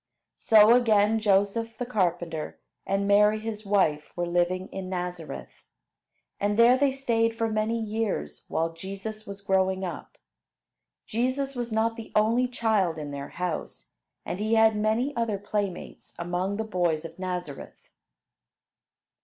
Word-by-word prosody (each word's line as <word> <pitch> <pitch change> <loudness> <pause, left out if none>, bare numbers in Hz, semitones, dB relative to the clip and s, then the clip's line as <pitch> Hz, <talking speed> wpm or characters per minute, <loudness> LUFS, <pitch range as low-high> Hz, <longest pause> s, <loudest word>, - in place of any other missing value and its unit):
So 220 0 +6
again 220 -2 +3
Joseph 215 +2 +1
the 245 - -3
carpenter 175 -8 -2 0.3
and 195 0 0
Mary 210 +1 +5
his 215 -1 -6
wife 160 -7 +1
were 175 - 0
living 175 +2 0
in 190 -1 -6
Nazareth. 180 -3 -6 0.8
And 205 +1 0
there 235 +2 +7
they 275 +1 +2
stayed 230 -4 0
for 225 - +1
many 215 +2 0
years 220 -1 -3
while 165 +1 -1
Jesus 195 +5 -7
was 200 0 -8
growing 190 -1 +1
up. 180 - -6 0.9
Jesus 260 +4 -1
was 240 -1 -3
not 225 +1 +1
the 225 - -9
only 230 +4 +3
child 215 -9 +1
in 150 -2 -5
their 140 0 -6
house, 180 -3 -5 0.3
and 180 - -4
he 215 +2 +1
had 220 -1 +5
many 220 +6 0
other 230 -3 0
playmates 200 -2 -4
among 180 +3 -2
the 220 - -1
boys 175 -6 0
of 165 +2 -10
Nazareth. 180 -6 -6
205 Hz, 140 wpm, -27 LUFS, 180-225 Hz, 0.9 s, there